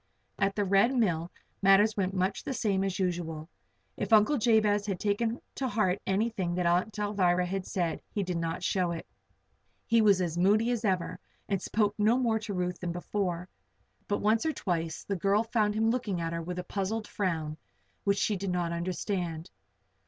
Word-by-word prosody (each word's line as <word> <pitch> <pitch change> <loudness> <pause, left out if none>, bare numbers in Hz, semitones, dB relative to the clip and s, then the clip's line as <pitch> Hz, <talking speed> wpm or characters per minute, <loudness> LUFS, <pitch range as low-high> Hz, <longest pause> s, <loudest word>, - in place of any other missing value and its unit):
At 195 0 +1
the 205 - +1
Red 200 +7 +3
Mill 175 -8 +1 0.3
matters 200 +2 +5
went 195 -1 -1
much 185 +2 0
the 270 - -3
same 195 -4 +1
as 195 -1 -1
usual. 170 -4 -2 0.5
If - - -4
Uncle 220 +6 +5
Jabez 215 -2 +3
had 190 -3 -2
taken 225 +3 0
to 265 - -2
heart 205 -5 +1
anything 195 -3 0
that 180 -1 0
Aunt 180 +5 +1
Alvirah 185 -4 +2
had 190 +1 -3
said, 175 -3 -1
he 205 - -2
did 180 -2 -2
not 165 +2 -3
show 185 -1 +1
it. 165 - -6 0.8
He 230 0 +4
was 200 -3 +5
as 175 -2 -1
moody 215 +6 +3
as 240 -2 -1
ever 185 -5 -1 0.3
and 195 -2 -1
spoke 210 +1 +1
no 220 +4 +4
more 230 -4 +1
to 210 -1 -6
Ruth 180 0 -2
than 175 -1 -3
before. 180 0 -2 0.6
But 205 - -1
once 220 +2 +3
or 315 - 0
twice 165 - -2
the 200 - -2
girl 200 +4 +2
found 215 -2 +1
him 225 +1 +2
looking 210 -7 -1
at 165 0 -2
her 170 - -2
with 175 +2 -5
a 180 - -3
puzzled 205 +4 -3
frown 160 -6 -2 0.5
which 200 0 +2
she 210 +1 +1
did 195 0 -3
not 175 -2 -1
understand. 170 -1 -3
195 Hz, 190 wpm, -29 LUFS, 175-215 Hz, 0.8 s, matters